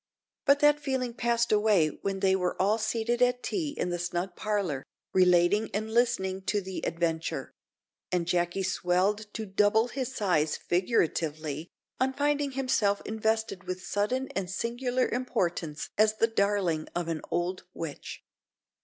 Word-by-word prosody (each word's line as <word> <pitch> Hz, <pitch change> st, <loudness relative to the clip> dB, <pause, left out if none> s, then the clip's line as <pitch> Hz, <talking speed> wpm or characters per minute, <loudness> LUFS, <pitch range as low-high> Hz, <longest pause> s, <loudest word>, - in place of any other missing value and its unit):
But 285 Hz, 0 st, +5 dB
that 295 Hz, 0 st, +5 dB
feeling 260 Hz, -4 st, -2 dB
passed 235 Hz, 0 st, +1 dB
away 210 Hz, -7 st, +4 dB
when 195 Hz, -1 st, -2 dB
they 190 Hz, -1 st, +4 dB
were 180 Hz, -1 st, -1 dB
all 205 Hz, +4 st, +3 dB
seated 230 Hz, +2 st, -1 dB
at 250 Hz, 0 st, +3 dB
tea 310 Hz, -7 st, -2 dB
in 180 Hz, -, -1 dB
the 175 Hz, -, -2 dB
snug 175 Hz, +1 st, -2 dB
parlour, 195 Hz, -11 st, -1 dB, 0.3 s
relating 185 Hz, +3 st, +4 dB
and 220 Hz, +1 st, -2 dB
listening 195 Hz, -6 st, +1 dB
to 205 Hz, -, +1 dB
the 190 Hz, -1 st, -6 dB
adventure; 165 Hz, -1 st, -2 dB, 0.6 s
and 180 Hz, -2 st, +1 dB
Jacky 175 Hz, +2 st, 0 dB
swelled 195 Hz, +4 st, 0 dB
to 220 Hz, -, -3 dB
double 210 Hz, +4 st, +3 dB
his 260 Hz, 0 st, -3 dB
size, 175 Hz, -10 st, +1 dB
figuratively, 160 Hz, -, -1 dB, 0.3 s
on 265 Hz, +1 st, +1 dB
finding 290 Hz, 0 st, 0 dB
himself 240 Hz, -7 st, +1 dB
invested 220 Hz, -3 st, -1 dB
with 185 Hz, 0 st, -5 dB
sudden 250 Hz, +6 st, -1 dB
and 190 Hz, -2 st, -3 dB
singular 245 Hz, +5 st, -1 dB
importance 175 Hz, -10 st, -2 dB
as 215 Hz, 0 st, +5 dB
the 225 Hz, -, +4 dB
darling 200 Hz, -7 st, 0 dB
of 175 Hz, -1 st, -1 dB
an 165 Hz, -2 st, -2 dB
"old 175 Hz, +2 st, -2 dB
witch." 160 Hz, -4 st, -6 dB
205 Hz, 145 wpm, -29 LUFS, 175-235 Hz, 0.6 s, But